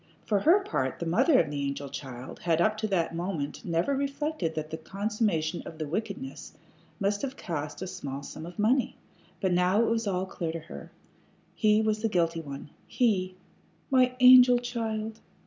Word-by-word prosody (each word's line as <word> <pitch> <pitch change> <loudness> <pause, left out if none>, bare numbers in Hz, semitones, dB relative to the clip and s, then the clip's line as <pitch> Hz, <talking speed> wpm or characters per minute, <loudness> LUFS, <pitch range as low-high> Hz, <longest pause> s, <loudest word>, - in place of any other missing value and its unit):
For 205 -2 +2
her 345 - +5
part, 130 - -2
the 170 - -4
mother 255 - +4
of 145 - +1
the 145 -1 -3
angel 140 0 -3
child 130 -2 -8
had 165 -2 +1
up 215 +5 +3
to 215 0 -1
that 170 -5 0
moment 165 -4 -4
never 170 +10 0
reflected 280 - -2
that 155 0 -4
the 160 - -3
consummation 195 -2 -1
of 160 - -9
the 155 -1 -4
wickedness 225 - -5 0.5
must 200 0 0
have 275 -1 -4
cost 150 -1 -4
a - - -3
small 140 -7 -6
sum 160 +1 -8
of 175 - -11
money. 240 +5 +2 0.4
But 190 -2 +1
now 180 +3 +3
it - - +1
was 225 -1 0
all 185 -1 0
clear 170 -3 -4
to 165 - -4
her. 165 - -10 0.6
He 215 -1 +3
was 215 0 0
the 225 - +1
guilty 165 -3 +1
one 140 -1 -8 0.2
he! 190 -7 +1 0.6
"My 255 -1 +4
angel 250 -1 +9
child!" 225 -3 -3
190 Hz, 180 wpm, -28 LUFS, 160-225 Hz, 0.6 s, angel